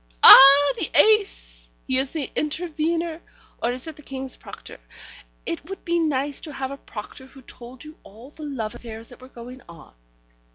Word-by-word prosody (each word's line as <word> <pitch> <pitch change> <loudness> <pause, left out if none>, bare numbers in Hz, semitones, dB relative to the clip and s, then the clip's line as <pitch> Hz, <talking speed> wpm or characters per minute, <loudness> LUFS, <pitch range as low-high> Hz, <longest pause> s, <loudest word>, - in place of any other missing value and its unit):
Ah, 280 - +9
the - - -3
ace! - - +1 0.2
He 260 0 0
is 265 0 -2
the 300 -3 -5
intervener, 330 +1 -3 0.4
or 235 - 0
is 250 +1 -7
it 315 - -9
the - - -13
King's 265 -2 -6
Proctor? - - -13 0.7
It 295 - -6
would 390 - -9
be 340 0 0
nice 285 -3 -2
to 305 - -9
have 270 0 -5
a 275 - -7
proctor 250 +2 -11
who 265 0 -17
told 245 +1 -13
you 305 0 -13
all 230 +7 -16
the 310 - -13
love 260 -8 -5
affairs 225 -1 -11
that 245 - -15
were 255 - -13
going 250 +1 -12
on. 170 -2 -15
270 Hz, 180 wpm, -22 LUFS, 245-310 Hz, 0.7 s, Ah